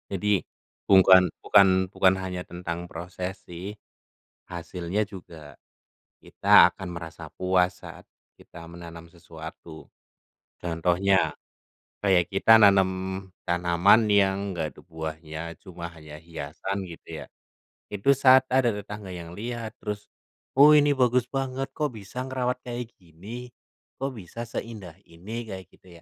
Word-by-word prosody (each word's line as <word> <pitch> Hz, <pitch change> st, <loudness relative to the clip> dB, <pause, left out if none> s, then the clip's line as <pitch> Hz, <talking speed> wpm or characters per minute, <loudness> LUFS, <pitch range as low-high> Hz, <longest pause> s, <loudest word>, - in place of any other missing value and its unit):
Jadi, 100 Hz, 0 st, +1 dB, 0.5 s
bukan 95 Hz, -1 st, +7 dB
bukan 95 Hz, -2 st, +5 dB
bukan 95 Hz, -2 st, +4 dB
hanya 95 Hz, -1 st, -4 dB
tentang 85 Hz, 0 st, -6 dB
proses 90 Hz, +2 st, -6 dB
sih. 90 Hz, +4 st, -7 dB, 0.7 s
Hasilnya 90 Hz, +3 st, -3 dB
juga, 80 Hz, -7 st, -12 dB, 0.6 s
kita -, -, +6 dB
akan 95 Hz, -, -8 dB
merasa 80 Hz, -1 st, -8 dB
puas 90 Hz, -1 st, +1 dB
saat -, -, -11 dB, 0.3 s
kita 85 Hz, -1 st, -13 dB
menanam 85 Hz, -1 st, -10 dB
sesuatu. 80 Hz, -1 st, -11 dB, 0.7 s
Contohnya, 90 Hz, +3 st, +1 dB, 0.7 s
kayak 90 Hz, -4 st, +3 dB
kita 110 Hz, +3 st, +6 dB
nanem 100 Hz, -3 st, +6 dB, 0.6 s
tanaman 90 Hz, +5 st, +4 dB
yang 100 Hz, 0 st, +2 dB
enggak 80 Hz, -4 st, -4 dB
ada -, -, -14 dB
buahnya, 80 Hz, -1 st, -6 dB, 0.2 s
cuma 90 Hz, -3 st, -8 dB
hanya 75 Hz, -2 st, -12 dB
hiasan 85 Hz, +4 st, -5 dB
gitu, 85 Hz, -2 st, -9 dB
ya. -, -, -12 dB, 0.6 s
Itu 105 Hz, +6 st, +2 dB
saat 130 Hz, -1 st, +6 dB
ada 130 Hz, -2 st, +4 dB
tetangga 105 Hz, -1 st, -8 dB
yang 85 Hz, -1 st, -8 dB
lihat, 115 Hz, +2 st, -5 dB
terus, 105 Hz, -1 st, -6 dB, 0.4 s
“Oh, 145 Hz, +3 st, +8 dB
ini 145 Hz, -1 st, +5 dB
bagus 125 Hz, -2 st, +2 dB
banget, 135 Hz, 0 st, -3 dB
kok 150 Hz, -6 st, -2 dB
bisa 105 Hz, +4 st, -7 dB
ngerawat 125 Hz, -1 st, -2 dB
kayak 120 Hz, -1 st, -6 dB
gini? 100 Hz, +9 st, -10 dB, 0.5 s
Kok 135 Hz, 0 st, -3 dB
bisa 115 Hz, +1 st, -8 dB
seindah 110 Hz, -6 st, -7 dB
ini?” 105 Hz, +8 st, -7 dB
Kayak 95 Hz, -3 st, -7 dB
gitu, -, -, -23 dB
95 Hz, 125 wpm, -26 LUFS, 85-110 Hz, 0.7 s, Oh